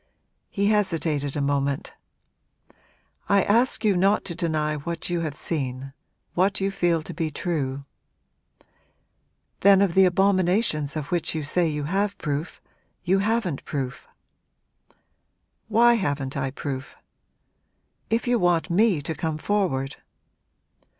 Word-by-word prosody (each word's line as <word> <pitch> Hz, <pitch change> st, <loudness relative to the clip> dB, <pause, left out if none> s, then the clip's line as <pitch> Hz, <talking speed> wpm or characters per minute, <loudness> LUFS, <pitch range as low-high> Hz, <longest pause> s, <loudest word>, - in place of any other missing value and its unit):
He 200 Hz, -, -1 dB
hesitated 165 Hz, -9 st, 0 dB
a -, -, 0 dB
moment. 140 Hz, 0 st, -1 dB, 1.4 s
'I 200 Hz, -1 st, +4 dB
ask 235 Hz, +2 st, +2 dB
you 205 Hz, -3 st, +4 dB
not 195 Hz, +4 st, +2 dB
to 175 Hz, -, -2 dB
deny 155 Hz, -2 st, -1 dB
what 170 Hz, +4 st, -4 dB
you 175 Hz, -, 0 dB
have 155 Hz, -4 st, -3 dB
seen 135 Hz, -4 st, -3 dB, 0.4 s
what 190 Hz, +2 st, +2 dB
you 195 Hz, 0 st, 0 dB
feel 170 Hz, -4 st, +1 dB
to -, -, -8 dB
be 160 Hz, -1 st, -2 dB
true.' 140 Hz, -4 st, -3 dB, 1.7 s
'Then 200 Hz, 0 st, +6 dB
of 195 Hz, -3 st, +2 dB
the 190 Hz, +1 st, +6 dB
abominations 185 Hz, -4 st, +2 dB
of 150 Hz, -2 st, -5 dB
which 175 Hz, -2 st, 0 dB
you 155 Hz, -, -2 dB
say 170 Hz, +4 st, +1 dB
you 150 Hz, -2 st, -2 dB
have 200 Hz, +6 st, -1 dB
proof, 150 Hz, +1 st, -4 dB, 0.4 s
you 190 Hz, +2 st, +2 dB
haven't 205 Hz, -7 st, -1 dB
proof.' 135 Hz, -4 st, -5 dB, 1.6 s
'Why 235 Hz, +2 st, +5 dB
haven't 145 Hz, -, -2 dB
I 135 Hz, -1 st, -1 dB
proof?' 135 Hz, -1 st, -6 dB, 1.1 s
'If 230 Hz, +2 st, 0 dB
you 245 Hz, -1 st, +2 dB
want 175 Hz, -1 st, +1 dB
me 190 Hz, -4 st, +3 dB
to 160 Hz, -, -3 dB
come 155 Hz, +1 st, -3 dB
forward!' 155 Hz, -8 st, -1 dB
170 Hz, 130 wpm, -24 LUFS, 145-195 Hz, 1.7 s, Then